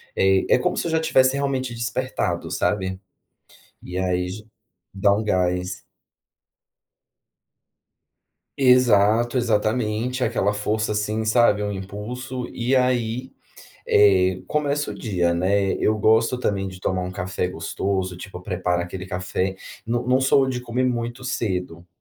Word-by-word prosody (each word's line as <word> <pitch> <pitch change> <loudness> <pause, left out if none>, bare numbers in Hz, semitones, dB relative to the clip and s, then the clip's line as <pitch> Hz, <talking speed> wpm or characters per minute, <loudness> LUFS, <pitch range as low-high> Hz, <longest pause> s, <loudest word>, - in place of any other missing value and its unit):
eh, 95 0 +3
é - - +6
como 180 - 0
se - - -2
eu - - -2
já 160 - +2
tivesse 130 -4 +3
realmente 130 -3 -2
despertado, 120 -8 -2
sabe. 95 +1 -1 0.8
E 90 +1 -5
aí 90 -1 0
já 105 +3 -7 0.5
dá 100 +1 +3
um 105 +2 0
gás. 90 -2 0 2.8
Exato, 120 -2 +4
exatamente, 115 +1 0
aquela 105 -3 +1
força 105 +1 -1
assim, 105 +1 -1
sabe, 110 -1 +3
um 105 - -2
impulso, 120 +7 -6
e, 125 +3 0
aí, 125 0 0 0.6
eh, 95 -2 +4
começa 145 -1 -1
o - - -6
dia, 90 -6 0
né. 95 +3 +1
Eu 110 0 +1
gosto 110 +3 +3
também 100 -5 -1
de 95 0 -10
tomar 95 -1 -1
um 90 - -5
café 90 0 -2
gostoso, 95 0 -3
tipo, 90 -1 -9
preparo 90 -2 -1
aquele 90 +2 -6
café, 90 0 -2 0.3
não 120 +2 -1
não 130 +1 +3
sou 135 0 +3
de 125 -1 -2
comer 125 +1 -2
muito 120 +1 -2
cedo. 90 -8 -3
105 Hz, 135 wpm, -23 LUFS, 95-125 Hz, 2.8 s, é